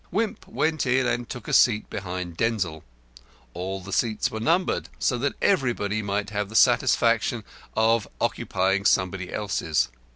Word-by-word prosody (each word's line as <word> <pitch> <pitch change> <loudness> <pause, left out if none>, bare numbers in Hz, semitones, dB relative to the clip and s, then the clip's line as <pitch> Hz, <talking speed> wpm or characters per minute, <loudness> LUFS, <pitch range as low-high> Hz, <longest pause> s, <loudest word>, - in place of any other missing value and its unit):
Wimp 220 0 -2
went 155 -3 0
in 130 +1 +2
and 120 0 -1
took 125 -4 -7
a - - -3
seat 110 -3 +4
behind 90 -3 -5
Denzil. 90 -8 -1 0.7
All 95 +2 -4
the 95 +1 -8
seats 110 -1 0
were 110 - -4
numbered, 170 +10 +1
so 125 - 0
that 140 +3 -1
everybody 120 - +1
might 100 0 -2
have 105 -1 -2
the 110 - -10
satisfaction - - +3 0.3
of 110 0 +3
occupying 95 +1 0
somebody 95 -1 +1
else's. 80 -11 0
105 Hz, 150 wpm, -25 LUFS, 95-120 Hz, 0.7 s, seat